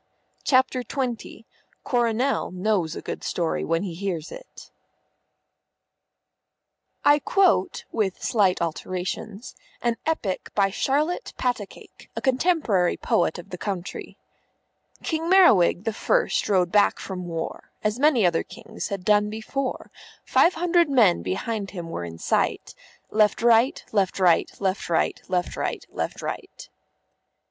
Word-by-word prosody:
CHAPTER 255 -1 +3
XX 250 -2 -4 0.4
CORONEL 240 +2 +1
KNOWS 185 -4 0
A - - -6
GOOD - - -6
STORY 170 -2 -1
WHEN 165 +2 0
HE 185 -4 -4
HEARS 170 -3 -4
IT - - -12 2.3
I 290 +1 +6
quote 365 - +2
(with 200 -4 -1
slight 195 -7 +2
alterations) 185 +6 -4 0.3
from 240 - 0
an 230 - -2
epic 220 -13 -2
by 195 -1 +3
Charlotte 300 - -1
Patacake, 240 -6 -5
a - - -2
contemporary 260 - +2
poet - - +1
of 175 - -11
the 180 - -6
country: 195 -3 -5 0.9
King 325 +1 -2
Merriwig 225 - +5
the 225 0 -2
First - - +1
rode 180 -3 +2
back 205 0 +4
from 180 -2 -6
war, 165 -1 -5
As 215 +3 0
many 275 -8 +4
other 170 -2 +2
Kings - - -7
had 195 -2 -5
done 210 0 +3
before; 235 +5 -4 0.3
Five 360 - +4
hundred 345 -2 +2
men 225 - +4
behind 195 - -3
him 170 -4 -7
were 85 - -4
in 85 -1 -8
sight - - -1 0.4
_(Left 215 0 +2
right, 235 +2 +4
left 195 -3 0
right, 180 -3 +3
left 190 -2 -1
right, 165 - 0
left 180 -1 -1
right, - - -3
left - - -4
right). - - -7
210 Hz, 135 wpm, -24 LUFS, 180-255 Hz, 2.3 s, I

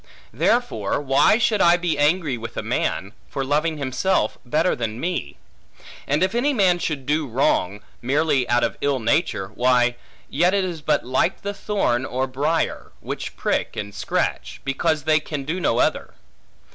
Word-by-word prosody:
Therefore 245 -8 +1
why 140 +8 +4
should 220 -3 +2
I 170 0 +6
be 175 -2 -1
angry 150 -2 +2
with 115 0 -8
a - - -2
man, 95 +2 -2 0.2
for 135 - -3
loving 155 +3 0
himself 135 - 0
better 155 +8 +1
than 115 -1 -4
me? 170 - -3 0.7
And 145 +5 +2
if 185 - +1
any 265 +5 +1
man 185 -7 +3
should 150 -5 -3
do 150 +1 0
wrong, 105 -5 0 0.2
merely 140 0 +1
out 120 0 +3
of - - -1
ill 140 -1 +1
nature, 115 - 0
why, 120 +2 +2 0.3
yet 175 +6 +2
it 195 - +2
is 170 -4 -5
but 150 -3 +1
like 130 +9 0
the 200 0 -3
thorn 195 - 0
or 130 0 -1
briar, 145 +5 -1
which - - -6
prick - - -1
and 105 0 -5
scratch, - - -2
because 150 +2 0
they 155 0 +3
can 150 -2 -5
do 160 +6 -3
no - - +1
other. - - 0
150 Hz, 170 wpm, -22 LUFS, 125-175 Hz, 0.7 s, I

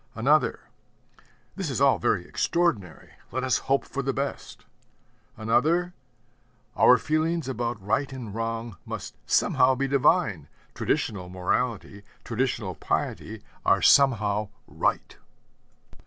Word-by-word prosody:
Another, - - +2 0.9
'This 190 -5 -3
is 135 - -2
all 135 -1 +4
very 95 -7 0
extraordinary: 135 - -1 0.2
let 130 - -2
us 130 - +1
hope 135 0 +2
for 140 - -4
the 135 0 -1
best.' 140 +1 -5 0.7
Another, 165 +11 +1 0.8
'Our 125 - +6
feelings 155 +3 -1
about 120 -3 -3
right 115 +8 -1
and 120 -6 -7
wrong 115 -2 -4
must - - -7
somehow 130 +1 +3
be 135 +1 -1
divine; 135 - +2 0.3
traditional 95 -5 -2
morality, 100 +3 -2 0.2
traditional 115 -5 -2
piety, 105 +5 -3 0.2
are - - +3
somehow 105 -7 +4 0.2
right.' - - -2
125 Hz, 110 wpm, -26 LUFS, 105-140 Hz, 0.9 s, Our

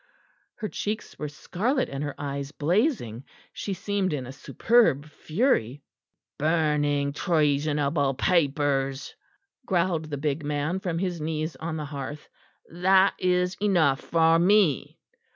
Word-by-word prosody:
Her 215 - -4
cheeks 210 +1 -5
were 150 - -3
scarlet 220 - -1
and 140 +1 -5
her 145 -1 -4
eyes 140 0 -4
blazing; 155 - 0 0.3
she 195 - -4
seemed 195 -3 -1
in 135 -4 -3
a 130 - -8
superb 145 - +2
fury. 150 - -1 0.6
"Burning 150 -2 +1
treasonable 145 -3 +1
papers," 140 -3 0 0.5
growled 170 -3 +1
the 150 -2 -5
big 145 +1 -2
man 150 +5 -1
from 175 -3 -3
his 175 -2 -2
knees 155 0 -3
on 160 +3 -4
the 150 - -4
hearth, 145 +1 -7 0.4
"that 190 +3 +4
is 180 0 +1
enough 165 -10 +3
for 165 0 +3
me." 185 -5 +3
155 Hz, 125 wpm, -26 LUFS, 145-180 Hz, 0.6 s, that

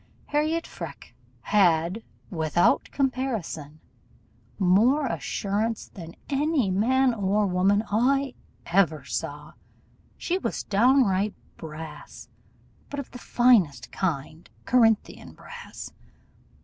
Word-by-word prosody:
Harriot 310 +3 0
Freke - - -9 0.3
had, 180 0 +2 0.3
without 160 -1 +2
comparison, 230 - -2 0.8
more 220 +10 +3
assurance 220 -2 -2
than 170 -3 -10
any 285 - +1
man 255 +6 +2
or 205 -1 +1
woman 195 +3 +2
I 265 +5 +2 0.3
ever 170 -4 +2
saw; - - -5 0.6
she 360 +2 -1
was - - -3
downright 210 -3 +3 0.2
brass, 160 0 -9 0.6
but 285 - -5
of 280 - -7
the 245 - -9
finest 235 - +3
kind 160 -2 -3 0.2
Corinthian 225 -4 +2
brass. 475 0 -10
210 Hz, 95 wpm, -26 LUFS, 180-260 Hz, 0.8 s, more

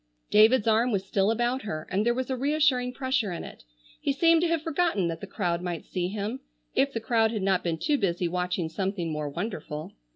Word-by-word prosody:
David's 220 +2 +6
arm 225 +3 +3
was 195 -3 -1
still 195 +1 +1
about 240 +3 0
her, 155 -7 -5
and 195 +3 +1
there 240 +1 +2
was 260 +1 -2
a - - +1
reassuring 275 -2 +2
pressure 260 -5 -1
in 170 - -5
it. - - -11 0.4
He - - 0
seemed 330 +3 +4
to 350 - +2
have 330 -2 0
forgotten 320 - +1
that 165 0 -5
the - - -6
crowd 175 -5 -1
might 175 -2 -4
see 180 -2 -2
him—if 255 +6 -3
the 230 - -2
crowd 225 0 +2
had 215 -3 -3
not 190 -1 +2
been 170 -2 -1
too 290 - +1
busy 175 -3 0
watching 180 0 -1
something 185 -1 -2
more 150 -1 -3
wonderful. 155 -3 -5
215 Hz, 215 wpm, -27 LUFS, 180-260 Hz, 0.4 s, David's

